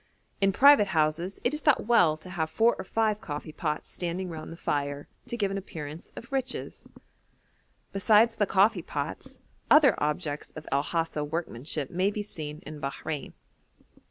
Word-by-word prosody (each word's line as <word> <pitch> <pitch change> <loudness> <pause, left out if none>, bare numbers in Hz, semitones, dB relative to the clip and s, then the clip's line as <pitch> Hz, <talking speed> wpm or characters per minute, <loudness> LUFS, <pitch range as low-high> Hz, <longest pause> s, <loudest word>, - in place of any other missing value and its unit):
In 195 0 +4
private 265 0 +7
houses 160 +5 0
it - - +1
is 300 - -2
thought 295 -8 +3
well 180 -10 +4
to 180 +3 -11
have 160 -3 -1
four 230 +6 +3
or - - -3
five 215 +1 0
coffee 150 +1 -6
pots 150 -1 -3
standing 180 +1 -4
round 160 -1 -7
the 165 - -9
fire, 145 -2 -2 0.2
to 240 -1 -4
give 200 -3 0
an 195 - -2
appearance 155 -4 -8
of 235 - -10
riches. 265 -2 -3 1.1
Besides 220 +3 +4
the 205 - +2
coffee 200 +3 +3
pots, - - -5 0.3
other 295 -6 +7
objects 150 -1 -2
of 155 -1 -9
El 140 +1 +3
Hasa 165 -1 -2
workmanship 150 -2 -4
may 185 +3 +2
be 210 0 -3
seen 155 -4 -7
in 150 -1 -8
Bahrein. 145 +2 -4
175 Hz, 165 wpm, -28 LUFS, 150-210 Hz, 1.1 s, private